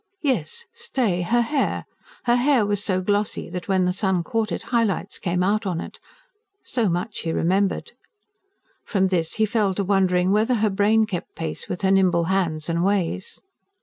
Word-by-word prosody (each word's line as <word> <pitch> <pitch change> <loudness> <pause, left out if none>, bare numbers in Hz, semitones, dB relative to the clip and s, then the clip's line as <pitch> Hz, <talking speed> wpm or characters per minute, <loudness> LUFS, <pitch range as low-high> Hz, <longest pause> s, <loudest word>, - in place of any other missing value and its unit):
Yes, 260 - -1
stay! 260 - -1
her 235 +7 +2
hair: 275 +4 -1 0.4
her 240 0 +3
hair 250 -3 +3
was 205 0 -1
so 185 -3 0
glossy 205 -2 -1
that, 180 -1 -5
when 190 -2 +2
the 180 - +1
sun 190 -2 0
caught 225 +4 -1
it, - - -3
high 235 -1 +4
lights 200 -2 -2
came 180 -1 0
out 210 +2 +1
on 175 -3 -1
it - - -8 0.6
so 235 -6 0
much 180 +5 -2
he 165 - -2
remembered. 190 +4 0 0.9
From 190 -3 +1
this 170 -3 0
he 220 - +3
fell 210 -3 0
to 200 - 0
wondering 185 -1 +2
whether 220 +5 +3
her 215 -2 +1
brain 210 +3 +3
kept 185 -5 -6
pace 160 -2 -5
with 180 - -4
her 190 - +3
nimble 185 -3 +3
hands 160 -5 -1
and 170 0 0
ways. 190 -2 -1
195 Hz, 180 wpm, -23 LUFS, 180-220 Hz, 0.9 s, high